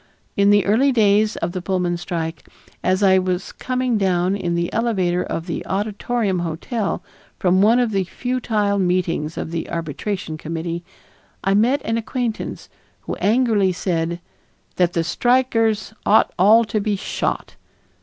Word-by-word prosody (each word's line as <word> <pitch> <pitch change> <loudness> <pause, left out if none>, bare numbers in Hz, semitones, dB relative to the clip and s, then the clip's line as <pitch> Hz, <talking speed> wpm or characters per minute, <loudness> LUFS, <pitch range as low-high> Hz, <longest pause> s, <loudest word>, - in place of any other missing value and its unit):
In 200 0 +4
the 205 -1 +4
early 245 +7 +3
days 215 -2 +3
of 170 - -2
the 185 0 -4
Pullman 180 -1 0
strike, 170 -2 -5 0.3
as 185 +2 +2
I 190 -1 +6
was 185 0 -2
coming 255 -3 -1
down 185 -1 +1
in 175 -4 -2
the 170 0 -1
elevator 190 -6 +1
of 165 - -4
the 170 - -4
Auditorium 205 0 -1
hotel 180 - -3 0.3
from 185 0 +3
one 220 +4 +5
of 240 -3 +1
the 195 -2 0
futile 215 -2 -1
meetings 175 -4 0
of - - -4
the 165 -1 -4
Arbitration 165 +1 -4
Committee, 165 +2 -4 0.6
I 195 - +2
met 235 +8 +3
an 225 +1 0
acquaintance, 235 0 -4 0.3
who - - -5
angrily 215 -4 +2
said 170 -1 -2 0.6
"that 180 -1 +2
the 165 - +1
strikers 225 +2 +1
ought 215 +2 +4
all 215 +5 +6
to 215 0 -1
be 205 0 0
shot." 195 - -3
195 Hz, 150 wpm, -21 LUFS, 175-220 Hz, 0.6 s, I